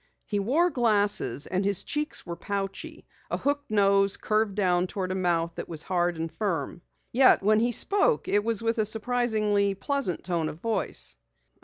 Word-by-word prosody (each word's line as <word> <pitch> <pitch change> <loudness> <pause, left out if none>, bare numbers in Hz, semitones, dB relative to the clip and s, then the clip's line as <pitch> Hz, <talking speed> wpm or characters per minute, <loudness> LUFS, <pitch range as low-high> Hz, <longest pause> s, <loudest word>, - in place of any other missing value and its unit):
He 205 - -2
wore 300 - +2
glasses 210 - +1
and 185 +1 -1
his 200 -1 +1
cheeks 300 +1 -2
were 170 - -5
pouchy; 195 +2 -5 0.2
a - - -1
hooked 285 +1 -2
nose 200 -1 +3
curved 215 -2 0
down 180 -3 +1
toward 185 -1 -4
a - - 0
mouth 170 -3 0
that - - -7
was 160 -2 -2
hard 175 -2 0
and 165 0 -4
firm. 170 -6 -3 0.3
Yet 255 -4 +5
when 215 +2 +4
he 240 +2 +1
spoke 405 - +2
it 205 +1 +2
was 230 -1 0
with 230 0 0
a 215 - +2
surprisingly 215 -3 +1
pleasant 275 - -2
tone 170 -3 -1
of 155 - -9
voice. 170 - -1
200 Hz, 175 wpm, -27 LUFS, 180-230 Hz, 0.3 s, Yet